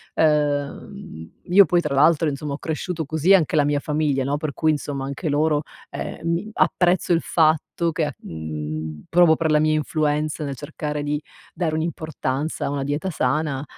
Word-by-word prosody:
Uhm, 145 - -1
io 195 +3 +6
poi, 175 0 +2
tra 150 -4 -2
l'altro, 160 +3 +4
insomma 145 0 -3
ho - - -3
cresciuto 160 +1 -3
così 160 +6 +3
anche 170 -5 +3
la 150 - +4
mia 145 0 +1
famiglia, 145 -3 0
no, 140 +2 0
per 150 0 -3
cui 155 +2 +1
insomma 145 -2 -3
anche 140 +4 -4
loro, 150 +1 +2 0.3
ehm, - - -5
mi 170 +6 -1
apprezzo 180 -4 +2
il 165 - +2
fatto 160 +1 +1
che, 155 -2 -1
mhmm, 80 -1 -6
provo 170 -2 +5
per 160 - 0
la 150 - +4
mia 155 0 +2
influenza 150 0 -1
nel 140 -2 -4
cercare 150 +1 -4
di 145 0 -2 0.3
dare 165 -4 -1
un'importanza 155 -3 -3
a - - -1
una 140 -1 -2
dieta 145 +6 -2
sana, 145 -2 -1
150 Hz, 175 wpm, -22 LUFS, 140-160 Hz, 0.3 s, io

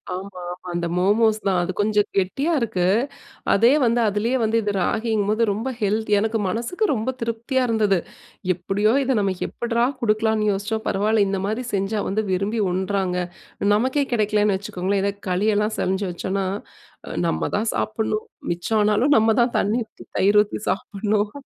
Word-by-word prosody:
ஆமாமா. 180 -2 -6 0.2
அந்த 175 0 -2
மோமோஸ் 215 +3 +3
தான். 185 -2 +2
அது 185 - -2
கொஞ்சம் 210 0 +2
கெட்டியா 200 - 0
இருக்கு. 185 -6 0 0.7
அதே 230 +5 +5
வந்து 240 0 +2
அதுலயே 220 +5 0
வந்து 225 +1 +2
இது 205 -1 -1
ராகிங்கும்போது 220 +2 +1
ரொம்ப 225 +6 -2
ஹெல்தி. 210 +1 0
எனக்கு 220 +1 0
மனசுக்கு 240 - -1
ரொம்ப 230 +1 -2
திருப்தியா 230 +3 -1
இருந்தது. 210 -4 +2 0.6
எப்டியோ 195 +5 +1
இத 265 0 +1
நம்ம 195 -2 +1
எப்டிரா 235 0 0 0.2
குடுக்கலாம்னு 215 -1 +2
யோசிச்சோம். 220 +3 -3
பரவால்ல 210 +1 +2
இந்த 195 0 -1
மாரி 220 +5 -2
செஞ்சா 200 +2 0
வந்து, 215 +3 0
விரும்பி 200 +4 0
உண்றாங்க. 190 0 -1 0.6
நமக்கே 260 +6 +1
கெடைக்கலைன்னு 210 -2 +2
வச்சுக்கோங்களேன். 195 0 -2
இதே 200 0 0 0.2
களி 185 +4 +1
எல்லாம் 210 +1 0
சமைச்சு 190 +1 0
வச்சோம்ன்னா, 190 +2 -2 0.8
நம்ம 165 - -1
தான் 220 +1 0
சாப்பிடணும், 215 0 -2 0.2
மிச்சம் 175 +6 0
ஆனாலும், 220 +8 +3
நம்ம 220 0 +4
தான் 235 0 +1
தண்ணீ 215 +5 +1
ஊத்தி - - -15
தயிர் 205 +2 +5
ஊத்தி 210 - -7
சாப்பிடணும். 210 0 -1
210 Hz, 150 wpm, -22 LUFS, 195-225 Hz, 0.8 s, அதே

